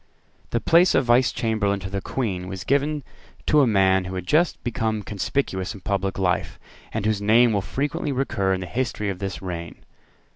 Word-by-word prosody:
The 120 - 0
place 170 +7 +4
of - - +3
Vice 120 +2 +4
Chamberlain 110 -4 0
to 95 - -5
the 100 -1 -2
Queen 95 -9 -3
was 95 0 -6
given 145 +3 0 0.4
to 150 -1 +5
a 135 - +4
man 95 -3 +3
who 95 +1 -5
had 90 -1 -4
just 160 - +2
become 110 -3 -1
conspicuous 100 -1 -2
in 100 - -11
public 95 0 -1
life, 95 -1 0 0.3
and 110 -2 -3
whose 110 -2 +1
name 115 +3 +5
will 100 - +1
frequently 145 - -2
recur 120 -8 0
in 95 -1 0
the - - -4
history 105 -1 -2
of 95 -2 -4
this 95 -4 -5
reign. 85 -2 -6
105 Hz, 190 wpm, -24 LUFS, 95-130 Hz, 0.4 s, to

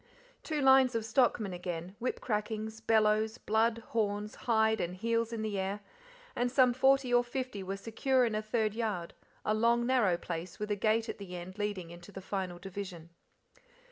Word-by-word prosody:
Two 305 -2 -2
lines 265 -2 +6
of 225 -1 -1
stockmen 225 -4 +2
again, 175 +1 -5
whip 250 +1 -2
crackings, 220 0 -3
bellows, 220 0 +2
blood, 225 +1 +1
horns, 210 -1 -1
hide 220 -1 +2
and 175 +1 -3
heels 230 +3 0
in 225 -2 -3
the 210 -2 -2
air, 195 +2 -2 0.5
and 245 0 0
some 255 -2 +5
forty 265 0 +3
or 245 0 +5
fifty 250 -4 -4
were 195 +1 -4
secure 250 +5 +1
in 225 - -1
a 215 - 0
third 215 -1 0
yard, 210 -7 -3 0.3
a 215 - +2
long 235 +2 +3
narrow 235 -9 +3
place 170 0 -6
with 210 0 -4
a - - +2
gate 220 +3 +1
at - - -5
the 185 -3 -7
end 180 +3 -8
leading 200 -5 -3
into 175 +3 -12
the 195 - -7
final 190 -2 -4
division. 180 -3 -7
215 Hz, 180 wpm, -32 LUFS, 195-235 Hz, 0.5 s, lines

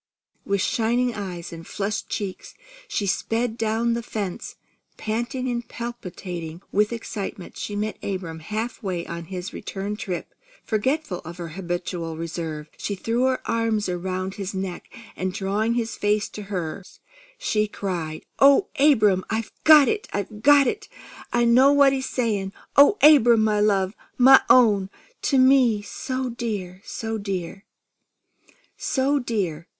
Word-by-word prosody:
With 200 -1 0
shining 240 +2 +1
eyes 180 -5 -6
and 165 0 -9
flushed 210 +1 -3
cheeks, 200 -4 -5 0.3
she 205 - -2
sped 225 +4 -1
down 225 +1 0
the 235 - -1
fence. 205 -5 -5 0.4
Panting 235 +4 -2
and 240 -1 -3
palpitating 180 -8 -7
with 210 +2 +2
excitement, 205 -5 -6
she 205 - -5
met 215 +1 -3
Abram 180 -5 -4
half 215 +8 -4
way 180 -4 -3
on 170 0 -6
his 180 +1 -6
return 200 +1 -5
trip. 185 -4 -5 0.3
Forgetful 235 - -1
of 170 +2 -10
her 170 -2 -6
habitual 175 -1 -4
reserve, 160 -2 -5
she 200 - -3
threw 230 +6 0
her 260 -1 +1
arms 225 -2 0
around 185 +1 -3
his 195 -1 -5
neck, 190 -2 -5 0.2
and 185 0 -3
drawing 210 +4 0
his 230 -2 -2
face 205 0 +1
to 210 - -8
hers, 180 -1 -5 0.4
she 215 - 0
cried: 175 -6 -4
"Oh, 280 +7 +6
Abram! 215 -10 +4
I 220 +1 0 0.2
got 305 -3 +9
it! 430 -1 -1
I 200 - -1
got 275 +8 +4
it! 425 +7 -3 0.4
I 240 0 +2
know 255 +4 +6
what 280 -1 +5
he's 265 -1 -2
saying! 205 -6 -1 0.2
Oh, 285 +9 +7
Abram, 240 -7 +7
my 210 -1 +2
love! 200 -2 +2 0.2
My 265 +1 +8
own! 205 -6 +5 0.3
To 275 - +2
me 255 -5 +5
so 255 +3 -4
dear! 205 -6 -4
So 225 -1 -4
dear!" 195 -1 -5 1.1
"So 280 +2 +1
dear! 190 - -3
210 Hz, 145 wpm, -24 LUFS, 185-240 Hz, 1.1 s, got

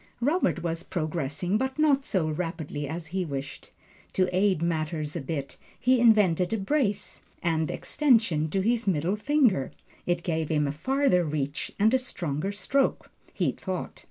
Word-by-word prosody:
Robert 280 - +1
was 165 -1 -2
progressing, 170 +3 -2
but 265 +2 -2
not 285 -3 +3
so 180 -5 0
rapidly 155 -2 -3
as 165 +3 -5
he 190 -1 0
wished. 140 -3 -6 0.4
To 185 -1 +1
aid 190 -2 +3
matters 155 -2 -2
a - - -2
bit, 140 0 -5 0.2
he 255 0 +3
invented 205 -7 +4
a - - +1
brace 210 0 -1 0.2
and 160 -2 +1
extension 220 - +2
to 195 +4 0
his 230 +1 +1
middle 175 +2 +1
finger. 235 - +2 0.4
It 175 -1 0
gave 160 -3 -1
him 150 -2 +1
a - - -1
farther 260 - +2
reach 145 -2 -3
and 215 +4 +3
a 260 - +4
stronger 175 - -3
stroke, 265 +6 0 0.2
he - - 0
thought. - - -5
180 Hz, 155 wpm, -27 LUFS, 155-225 Hz, 0.4 s, invented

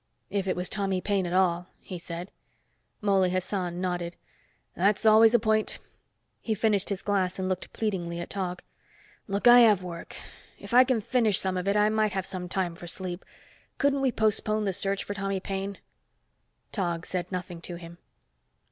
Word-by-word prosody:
"If 195 -1 -1
it 185 - +1
was 180 0 -1
Tommy 195 -2 -1
Paine 195 -1 0
at 175 - -4
all," 180 -1 +2
he 180 -2 -8
said. 170 +2 -7 0.7
Mouley 195 -3 +3
Hassan 180 -1 -2
nodded. 175 -2 -2 0.6
"That's 200 +4 +2
always 220 +1 +7
a - - +6
point." 215 0 +1 0.6
He 220 - -2
finished 205 -2 +1
his 195 -2 -3
glass 190 -3 0
and 190 -1 -2
looked 185 -1 -3
pleadingly 175 -6 -2
at 175 - -6
Tog. 180 -3 -3 0.6
"Look, 200 +3 +1
I 240 0 +10
have 210 -6 +5
work. 170 -2 -7 0.4
If - - -10
I 250 +1 +9
can 250 -4 +1
finish 220 -3 +2
some 190 -1 0
of 180 +1 -2
it, 200 +1 +2
I 210 0 +4
might 215 -1 +1
have 190 -1 -2 0.2
time 180 -2 -1
for 175 +1 -10
some - - -3
sleep. 180 0 -5 0.5
Couldn't 280 -1 +2
we 265 -2 +2
postpone 215 -1 +1
the 195 -2 0
search 195 +2 -1
for 205 - -4
Tommy 195 -1 -2
Paine." 195 +1 -4 0.9
Tog 175 -4 -2
said 180 0 -4
nothing 180 -2 -5
to 175 - -6
him. 170 0 -11
195 Hz, 180 wpm, -27 LUFS, 180-210 Hz, 0.9 s, I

